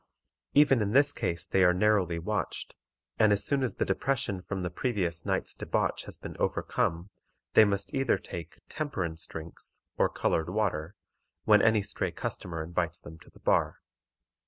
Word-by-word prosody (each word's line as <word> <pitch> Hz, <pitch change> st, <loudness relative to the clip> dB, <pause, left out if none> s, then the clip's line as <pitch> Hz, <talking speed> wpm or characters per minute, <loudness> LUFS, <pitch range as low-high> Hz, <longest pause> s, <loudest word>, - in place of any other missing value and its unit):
Even 140 Hz, -4 st, +6 dB
in 105 Hz, 0 st, 0 dB
this 145 Hz, +2 st, +5 dB
case 85 Hz, -7 st, -2 dB
they 95 Hz, 0 st, +3 dB
are 90 Hz, 0 st, +5 dB
narrowly 95 Hz, -4 st, +2 dB
watched, 105 Hz, +5 st, -3 dB, 0.4 s
and 110 Hz, -1 st, +5 dB
as 100 Hz, -1 st, +2 dB
soon 140 Hz, -1 st, +1 dB
as 130 Hz, -, -1 dB
the -, -, 0 dB
depression 135 Hz, -9 st, -1 dB
from 95 Hz, 0 st, -4 dB
the 90 Hz, -, -2 dB
previous 90 Hz, -5 st, -2 dB
night's -, -, -1 dB
debauch -, -, -1 dB
has -, -, -5 dB
been -, -, -8 dB
overcome, 85 Hz, +4 st, -1 dB, 0.4 s
they 110 Hz, -, +8 dB
must 100 Hz, -1 st, -2 dB
either 135 Hz, -2 st, +2 dB
take 85 Hz, -1 st, -8 dB
"temperance 95 Hz, -, -3 dB
drinks," 80 Hz, +1 st, -6 dB, 0.2 s
or -, -, +4 dB
colored 80 Hz, +1 st, 0 dB
water, 95 Hz, -3 st, -1 dB, 0.5 s
when 105 Hz, -1 st, +6 dB
any 110 Hz, -2 st, +4 dB
stray 100 Hz, -, -2 dB
customer 80 Hz, -3 st, -4 dB
invites 85 Hz, +1 st, -2 dB
them 80 Hz, +2 st, -12 dB
to -, -, -17 dB
the -, -, -20 dB
bar. -, -, +2 dB
95 Hz, 165 wpm, -29 LUFS, 85-110 Hz, 0.5 s, they